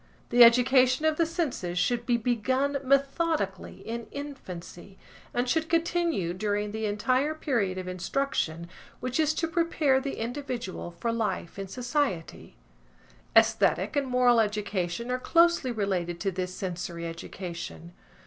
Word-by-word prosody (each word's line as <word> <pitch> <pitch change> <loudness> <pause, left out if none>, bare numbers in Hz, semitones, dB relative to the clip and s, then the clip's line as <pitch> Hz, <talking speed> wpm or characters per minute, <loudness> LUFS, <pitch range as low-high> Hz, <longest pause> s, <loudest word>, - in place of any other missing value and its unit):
The 240 0 +8
education 255 +3 +5
of 315 -1 +2
the 335 - +2
senses 265 - -2
should 235 +6 0
be 240 -1 +3
begun 260 +4 0
methodically 275 - 0
in 230 0 -4
infancy, 195 -10 -8 0.3
and 245 +1 -1
should 320 +4 0
continue 330 - +1
during 205 +2 -1
the 220 0 -2
entire 255 +8 +1
period 225 -12 -1
of 185 -1 -5
instruction 180 - -2 0.3
which 255 +3 -2
is 310 -1 +3
to 330 - 0
prepare 320 -5 +2
the 275 0 -4
individual 240 -6 -4
for 175 +7 -3
life 215 -5 -3
in 195 - -4
society. 245 - -2 0.8
Æsthetic 190 +8 +3
and 280 -2 +1
moral 250 -2 +4
education 210 0 -1
are 255 - 0
closely 335 -2 +3
related 185 -6 -2
to 195 - 0
this 185 0 -4
sensory 175 -2 -4
education. 165 - -7
235 Hz, 135 wpm, -28 LUFS, 185-275 Hz, 0.8 s, The